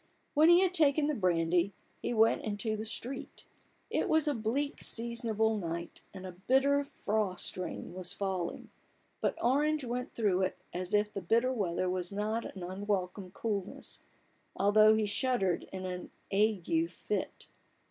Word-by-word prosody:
When 310 +3 +6
he 345 +1 +8
had 375 -1 +2
taken 300 -3 +4
the 300 - +1
brand} 175 - +1
7, 180 +3 +3 0.3
he - - -2
went 225 -1 +4
into 215 +1 -2
the 215 +1 -4
street. 250 +4 -6 0.5
It - - 0
was 315 -1 +3
a 295 - +3
bleak 260 +5 -2
seasonable 225 -2 +1
night, 170 -1 -5
and 190 -1 -9
a 185 - -5
bitter 270 +10 +2
frost 210 -8 -2
rain 180 -1 -5
was 180 -1 -4
falling: 190 -3 -3 0.5
but - - 0
Orange 295 +4 +2
went 245 +1 -4
through 200 -5 +2
it, 185 - 0 0.2
as 185 +3 -1
if 210 0 +1
the 195 - -3
bitter 235 +8 +2
weather 185 -5 -1
was 180 0 -2
a - - -7
not 215 0 -2
unwelcome 185 0 -3
coolness, 205 -3 -4 0.6
although 215 +2 +6
he 220 -1 +1
shuddered 205 -4 0
in 185 -1 -5
an 180 -1 -5 0.2
ague 215 - +2
fit. - - -4
210 Hz, 160 wpm, -32 LUFS, 185-250 Hz, 0.6 s, he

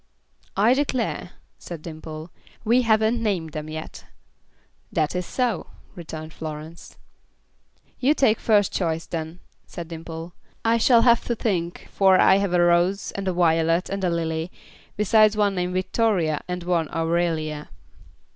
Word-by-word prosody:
"I 220 +5 +5
declare," 255 -9 -1 0.3
said 165 -3 -8
Dimple, 155 0 -8 0.3
"we 240 +3 +4
haven't 220 0 +2
named 185 -8 -1
them 155 0 -5
yet." 155 0 -8 0.9
"That 155 +2 0
is 180 -1 -2
so," 245 -7 -1 0.3
returned 160 -3 -8
Florence. 155 +1 -8 1.0
"You 280 +4 +3
take 230 -7 +3
first 205 -3 +2
choice, 165 -3 -1
then," 165 +1 -6 0.3
said 170 -2 -8
Dimple. 165 +1 -7 0.3
"I 230 +1 +3
shall 230 0 +5
have 235 -1 +5
to 235 - -1
think, 175 -6 -2
for 190 -1 +4
I've 195 +1 +5
had 190 -3 0
a 175 - +4
Rose 175 +3 +2
and 195 -1 -5
a 185 - +1
Violet 165 0 +2
and 195 0 -3
a 180 - +2
Lily, 165 0 -2 0.5
besides 215 +1 +4
one 205 -2 +2
named 180 -1 -2
Victoria, 185 -5 +1
and 180 -1 -4
one 170 -3 0
Aurelia." 165 -2 -1
180 Hz, 145 wpm, -24 LUFS, 165-210 Hz, 1.0 s, I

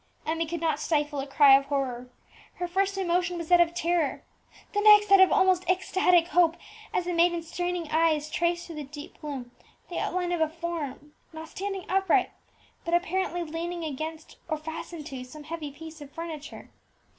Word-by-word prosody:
Emmie 325 +1 -1
could 340 +1 -4
not 320 -3 0
stifle 295 -2 0
a 270 - -4
cry 275 -1 +7
of 275 0 +2
horror. 255 -3 -3 0.5
Her 355 - -3
first 390 +2 0
emotion 355 -1 0
was 335 -2 -6
that 355 -1 +7
of 340 0 +2
terror, 335 -4 0 0.5
the 415 - +1
next 420 -1 +7
that 395 -1 +7
of 380 - +7
almost 375 -2 +3
ecstatic 360 -2 +3
hope, 340 -2 +3 0.3
as 355 - -1
the 355 - -2
maiden's 340 -1 +1
straining 355 -2 -2
eyes 315 -2 +2
traced 345 0 0
through 330 -3 -9
the 300 - -4
deep 290 +2 -11
gloom 270 -5 -6 0.4
the 350 - -3
outline 360 -1 -1
of 345 -2 -1
a 320 - +3
form, 320 -3 -6 0.2
not 320 0 -8
standing 390 0 -5
upright, 385 0 +2 0.5
but 335 0 +1
apparently 350 0 -1
leaning 335 +2 -4
against 315 +2 -6
or 310 - 0
fastened 320 0 -7
to 260 -3 -6
some 295 +4 -11
heavy 315 -1 -5
piece 320 +2 -11
of 290 - -9
furniture. 320 -2 -8
335 Hz, 180 wpm, -27 LUFS, 305-355 Hz, 0.5 s, cry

